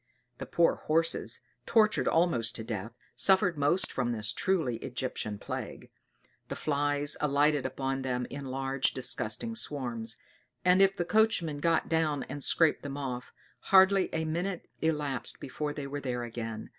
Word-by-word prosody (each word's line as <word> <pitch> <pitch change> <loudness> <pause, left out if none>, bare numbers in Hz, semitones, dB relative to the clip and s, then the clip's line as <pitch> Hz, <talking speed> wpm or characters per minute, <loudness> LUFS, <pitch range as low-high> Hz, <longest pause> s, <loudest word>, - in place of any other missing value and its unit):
The - - -6
poor 170 -1 +3
horses, 165 +1 +1 0.3
tortured 215 -2 +3
almost 160 -10 +2
to 110 - -3
death, 110 -1 -5 0.2
suffered 190 -2 +4
most 145 +5 +1
from 125 -2 -1
this 110 0 -1
truly 160 -11 0
Egyptian 125 -4 -4
plague; - - -7 0.6
the - - -5
flies 145 0 0
alighted 145 -1 +2
upon 135 +1 -3
them 125 -1 -2
in 140 0 -6
large 135 0 0
disgusting 130 - +1
swarms; 120 - -3 0.5
and 180 +1 +5
if 195 0 +4
the 175 - -1
coachman 180 -7 +2
got 165 +1 +1
down 155 -3 0
and 145 - -6
scraped 165 -2 +3
them 140 -1 -6
off, 125 -3 -5 0.4
hardly 190 0 +6
a 160 0 -1
minute 175 +3 -3
elapsed 150 -6 -1
before 150 +3 -4
they 145 -1 -5
were 145 +1 -5
there 125 -3 -3
again. 115 -2 -6
145 Hz, 150 wpm, -30 LUFS, 125-165 Hz, 0.6 s, hardly